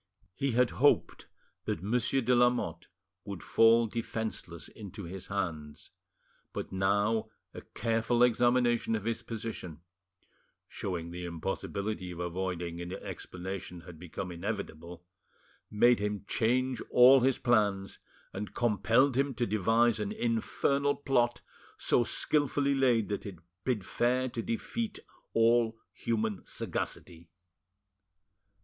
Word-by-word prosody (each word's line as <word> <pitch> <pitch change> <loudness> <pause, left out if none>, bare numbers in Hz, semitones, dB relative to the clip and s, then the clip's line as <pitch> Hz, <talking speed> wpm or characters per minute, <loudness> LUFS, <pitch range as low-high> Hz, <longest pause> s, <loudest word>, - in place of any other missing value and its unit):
He 135 +5 -1
had 125 +1 +3
hoped 145 +3 +2 0.4
that 80 - -2
Monsieur 120 +5 +1
de 125 +1 +2
Lamotte 120 -9 +2 0.4
would 100 -5 -7
fall 115 +1 +5
defenceless 110 -7 -4
into 100 -1 -9
his 90 +2 -7
hands; 80 -7 -4 0.6
but - - -5
now 100 +4 +1 0.2
a - - -8
careful 115 +2 0
examination 120 -1 +3
of 105 - -3
his 115 +1 -2
position, 110 -8 -6 0.9
showing 85 -3 -4
the 90 +1 -6
impossibility 95 +3 -3
of 90 - -7
avoiding 85 -1 -3
an 85 +1 -6
explanation 90 -1 -6
had 85 -2 -12
become 90 +2 -6
inevitable, 85 -2 -6 0.6
made 120 +2 +4
him 105 0 -3
change 125 +2 +1
all 130 +2 +8
his 130 +1 +2
plans, 100 -5 +1 0.3
and 100 +2 -6
compelled 120 +3 +3
him 135 0 +1
to 120 - 0
devise 115 +2 +2
an 105 -1 -2
infernal 140 +5 0
plot, 120 -4 +1 0.4
so 120 - +2
skilfully 145 +2 +1
laid 125 -5 +3
that 100 - -2
it 95 -3 -8 0.3
bid 120 -7 -1
fair 125 +2 +1
to 120 - -4
defeat 210 - -3 0.4
all 115 0 +3 0.2
human 110 -4 -2
sagacity. 85 -1 -5
110 Hz, 120 wpm, -30 LUFS, 95-120 Hz, 0.9 s, all